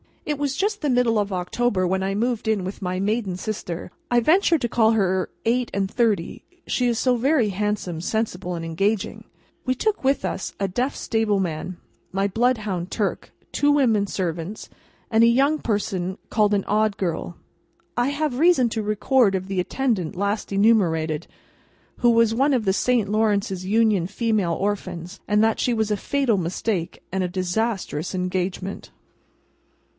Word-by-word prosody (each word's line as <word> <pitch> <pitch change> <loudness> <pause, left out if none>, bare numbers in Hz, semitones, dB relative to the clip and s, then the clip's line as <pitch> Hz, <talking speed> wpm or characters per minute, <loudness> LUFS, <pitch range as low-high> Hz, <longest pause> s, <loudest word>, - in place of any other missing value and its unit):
It 295 -2 -2
was 280 -2 -1
just 415 +1 -1
the 295 - 0
middle 245 -3 +3
of 205 -1 -1
October 185 +2 0
when 190 +1 0
I 195 +1 -1
moved 235 +1 -1
in 215 -4 +1
with 190 +3 -6
my 185 -1 -2
maiden 200 -2 -1
sister 185 -5 -5 0.2
(I 240 - +4
venture 330 - +4
to 240 -5 -2
call 225 -1 +3
her 190 -3 +1 0.2
eight 240 +2 +1
and 195 0 -1
thirty, 215 -8 0 0.2
she 250 - 0
is 235 -1 +1
so 250 0 +2
very 260 -2 +2
handsome, 195 -4 -2
sensible, 185 -3 -2
and 165 - -5
engaging). 195 +5 -1 0.4
We 255 -1 +1
took 425 - -1
with 270 +1 +2
us, - - -3
a 195 - 0
deaf 245 +9 -1
stable 220 -3 0
man, 175 0 -3 0.3
my 195 +1 +1
bloodhound 210 -5 0
Turk, 205 -1 -2 0.2
two 290 0 +2
women 230 -8 +3
servants, 175 +1 -4 0.4
and 225 0 +5
a - - +7
young 275 +6 +3
person 190 -3 -2
called 210 -1 +2
an 195 - -1
Odd 215 -1 +1
Girl. 175 -1 -3 0.6
I 245 +2 +2
have 285 -3 -1
reason 310 -8 +4
to 220 0 -2
record 215 +1 +2
of 185 0 -3
the 195 -1 -2
attendant 200 - -1
last 200 +3 -2
enumerated, 175 -7 +2 0.7
who 240 - +3
was 230 -1 +4
one 275 +5 +2
of 240 -4 +1
the 190 - +3
Saint 235 -1 +1
Lawrence's 205 -3 0
Union 210 -3 +2
Female 205 -4 0
Orphans, 185 -1 -3
that 215 +1 +2
she 245 - +1
was 220 -2 0
a 210 - +1
fatal 270 -2 +1
mistake 180 +1 -2
and 190 0 0
a - - 0
disastrous 185 -2 -2
engagement. 185 +1 -3
210 Hz, 165 wpm, -23 LUFS, 185-235 Hz, 0.7 s, a